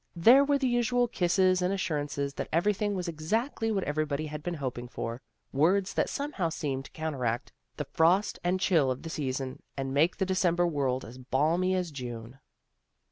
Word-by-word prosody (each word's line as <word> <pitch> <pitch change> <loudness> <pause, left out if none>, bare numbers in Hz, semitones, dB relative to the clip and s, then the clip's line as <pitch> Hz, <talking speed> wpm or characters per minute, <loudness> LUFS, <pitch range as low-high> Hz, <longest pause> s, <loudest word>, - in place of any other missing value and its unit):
There 235 +11 +7
were 285 0 +2
the 270 -2 0
usual 245 0 +2
kisses 185 -3 +2
and 180 +1 +1
assurances 145 -6 -2
that - - -5
everything 205 +4 +1
was 180 -1 -3
exactly 220 - -1
what 195 -3 0
everybody 150 0 -1
had 150 0 -6
been 175 +2 -3
hoping 125 -4 -4
for, 120 0 -5 0.3
words 185 +8 +2
that - - +1
somehow 280 - -2
seemed 135 -4 -3
to - - -13
counteract 130 -7 -2 0.3
the - - -3
frost 180 +6 +2
and 180 +2 +1
chill 165 -8 +3
of 130 0 -3
the 165 - -6
season, 130 -3 -3 0.2
and 135 -1 -3
make 155 +6 +3
the 190 - +1
December 180 -2 +2
world 135 -6 0
as 125 +3 -11
balmy 160 +9 +1
as 180 -3 -2
June. 120 -2 -7
165 Hz, 180 wpm, -29 LUFS, 135-190 Hz, 0.3 s, There